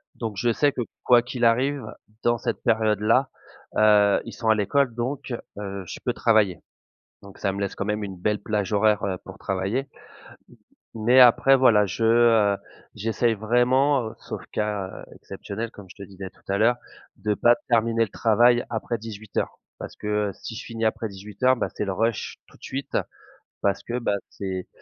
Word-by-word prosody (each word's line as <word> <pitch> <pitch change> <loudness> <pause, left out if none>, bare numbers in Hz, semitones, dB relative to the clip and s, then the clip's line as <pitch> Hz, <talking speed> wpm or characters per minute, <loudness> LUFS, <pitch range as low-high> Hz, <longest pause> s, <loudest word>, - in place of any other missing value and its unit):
Donc 115 -3 -4
je 120 +4 +2
sais 145 +5 +2
que - - -3 0.2
quoi 120 -1 +6
qu'il 120 0 -2
arrive 130 +3 +2 0.4
dans 120 0 +2
cette - - -3
période 110 -2 +2
là, 115 +5 +2 0.5
heu, 105 -1 +5
ils 115 - -8
sont 115 -2 -2
à 110 - +6
l'école 120 +5 +1
donc, 130 +2 -3 0.2
heu, 100 -1 -5
je - - -8
peux - - 0
travailler. 105 -6 +2 0.6
Donc 100 -1 -14
ça 100 - -1
me 100 - -4
laisse 100 - -3
quand 100 - -3
même 105 0 -2
une 95 -2 -6
belle 105 +4 0
plage 105 -1 -2
horaire, 105 0 +3
heu, 95 -2 -2
pour 95 0 -11
travailler. 100 +8 -2 1.1
Mais 120 +4 +4
après 125 +2 +7
voilà, 110 -6 +5
je, 95 - -5
heu, 115 -3 +4 0.4
j'essaye 115 +2 0
vraiment, 125 +3 +2
sauf - - -7
cas 105 -3 -3
exceptionnel, 110 +3 -7
comme 100 -4 -13
je - - -14
te 100 - -11
disais 95 -1 -8
tout - - -27
à 100 - +1
l'heure, 120 +3 +4 0.4
de 105 +1 -1
pas 120 +4 +5
terminer 115 -1 +2
le 115 - 0
travail 120 +3 +3
après 115 0 -3
18:00. 110 -1 -5 0.2
Parce - - -8
que 105 -1 -1
si 115 - -6
je 130 - -7
finis 115 -1 -4
après 110 0 0
18:00, 105 +6 0
bah 120 - -1
c'est - - -3
le 100 - -2
rush 115 +4 -2
tout - - -19
de - - -29
suite 135 +1 -4 0.7
parce 100 - 0
que, 120 - -3
bah, 110 - 0 0.2
c'est 95 -2 -5
110 Hz, 185 wpm, -24 LUFS, 100-120 Hz, 1.1 s, après